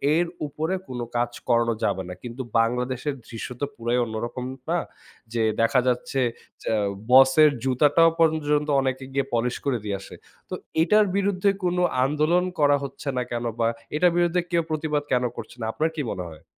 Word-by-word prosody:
এর 175 - +3 0.2
উপরে 160 +5 -3
কোন 125 -1 -6 0.2
কাজ 120 0 0 0.2
করানো 115 -1 +3
যাবে 95 - 0
না। - - -5
কিন্তু 120 +2 -6 0.2
বাংলাদেশের 125 +4 0
দৃশ্য 115 - -6
তো 145 - +2
পুরাই 120 0 -1
অন্যরকম, 120 +3 -4 0.2
না? 175 +1 +2 0.5
যে 115 - 0 0.2
দেখা 125 +3 +4
যাচ্ছে 125 +2 0 0.4
যেআ 110 - 0 0.3
বসের 135 +4 +7
জুতাটাও 145 +5 +4
পর্যন্ত 150 -2 +2
অনেকে 130 0 -2
গিয়ে 140 -1 +1
পলিশ 120 +1 0
করে 130 -4 +1
দিয়ে 100 -2 -2
আসে। - - -11 0.3
তো - - -6 0.3
এটার 210 +4 +4
বিরুদ্ধে 200 0 +2
কোন 180 0 +1 0.3
আন্দোলন 155 +5 +2 0.2
করা 145 -1 +5
হচ্ছে 140 +1 -8
না - - +2
কেন? 120 0 -2 0.2
বা 115 - +3 0.3
এটার 175 +3 +4
বিরুদ্ধে 175 +1 +2
কেউ 170 -1 +2
প্রতিবাদ 150 -1 -1
কেন 125 -1 +2
করছে - - -8
না? 110 - -2
আপনার 160 +1 +1
কি 150 - -2
মনে 90 -2 -4
হয়? 80 -2 -14
135 Hz, 175 wpm, -25 LUFS, 120-160 Hz, 0.5 s, বসের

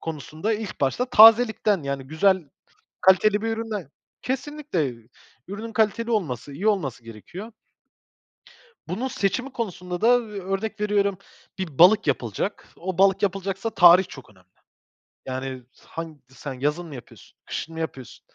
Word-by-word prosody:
konusunda 160 - -4
ilk 210 -2 -6
başta 140 - +1
tazelikten, 220 -4 +6
yani, 140 -1 -4
güzel, 190 +4 +2 0.6
kaliteli 205 +3 +4
bir 225 - -1
üründen 220 -8 -4 0.3
Kesinlikle 265 - -2 0.5
ürünün 220 +3 -6
kaliteli 230 0 +1
olması, 145 - -2
iyi 185 +10 -1
olması 140 - -1
gerekiyor. 170 - -10 1.4
Bunun 220 +10 -2
seçimi 250 +4 -1
konusunda 180 -7 -5
da, 230 - +4
ııı, 220 -4 -3
örnek 195 +3 -3
veriyorum, 200 -2 +1 0.4
bir 165 -8 -5
balık 185 0 +6
yapılacak. 130 - -2
O 185 0 -5
balık 195 0 +4
yapılacaksa 195 +2 -1
tarih 180 -2 +7
çok 135 - -12
önemli. 95 -3 -22 0.8
Yani, 130 0 -5 0.2
han 160 -4 -7
sen 135 +1 -8
yazın 150 +7 -2
mı 145 - -9
yapıyorsun, 125 - -14
kışın 165 - -5
mı 160 - -7
yapıyorsun. 135 -6 -6
190 Hz, 135 wpm, -24 LUFS, 145-215 Hz, 1.4 s, tarih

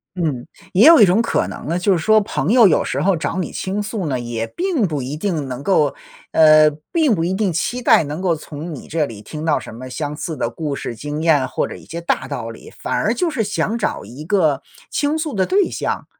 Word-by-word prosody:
嗯， 150 -9 -2 0.3
也 200 +6 +6
有 330 -1 +9
一 210 - +9
种 190 +5 +3
可 230 - 0
能 - - -8
呢， 170 +2 0
就 190 +2 +3
是 175 - +1
说 215 +6 +4
朋 200 - -2
友 235 -3 +7
有 - - +3
时 - - -2
候 195 -1 +3
找 165 +3 -3
你 180 - -2
倾 195 +2 -2
诉 205 -4 -3
呢， 130 -3 -1
也 120 -1 -3
并 345 - -1
不 150 -6 -2
一 130 +3 -4
定 155 -4 -2
能 130 +1 -6
够 150 -5 +2 0.4
呃， 155 -1 +7 0.2
并 310 -9 +3
不 165 - -1
一 175 +2 0
定 195 -2 0
期 240 +9 -2
待 235 - +5
能 150 +2 -5
够 180 -3 +1
从 155 +1 -7
你 - - -11
这 155 -1 0
里 110 -6 -9
听 155 +7 -7
到 155 -2 +2
什 130 - -8
么 130 +3 -9
相 145 +2 -4
似 165 0 -4
的 115 - -2
故 145 +4 -4
事 120 - -5
经 150 +5 -4
验， 150 -6 +3
或 - - -1
者 - - -7
一 - - -15
些 170 +1 -6
大 170 -6 -1
道 125 -5 -5
理， 115 - -11
反 - - -4
而 225 - +1
就 335 +8 0
是 305 -7 -2
想 215 +1 -1
找 215 - -2
一 140 +6 -10
个 160 -7 +2 0.3
倾 295 +2 0
诉 310 -3 -3
的 190 -2 +1
对 390 0 +2
象， - - -3
165 Hz, 265 characters per minute, -19 LUFS, 145-210 Hz, 0.4 s, 有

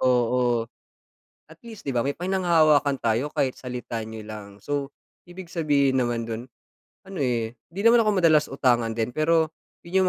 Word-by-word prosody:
Oo. 120 -1 +2 0.8
At 160 - -15
least 225 -3 -10
di 135 - -1
ba 120 - +3
may 140 - 0
pinanghahawakan 160 -7 +3
tayo 115 +6 0
kahit 130 -2 0
salita 125 -2 -5
niyo 110 0 -8
lang. 105 -2 -8
So, 145 +1 -3 0.4
ibig 175 -1 -10
sabihin 145 -5 +2
naman 120 -1 -2
dun 115 +1 -4 0.6
ano, 190 -5 -7
eh, 120 -3 0 0.2
di 195 +6 -6
naman 235 +1 +7
ako 215 -2 +3
madalas 155 -2 +5
utangan 120 -4 +1
din, 115 +2 -1
pero 160 +1 +2 0.3
yun 185 +3 +1
140 Hz, 160 wpm, -25 LUFS, 120-165 Hz, 0.8 s, naman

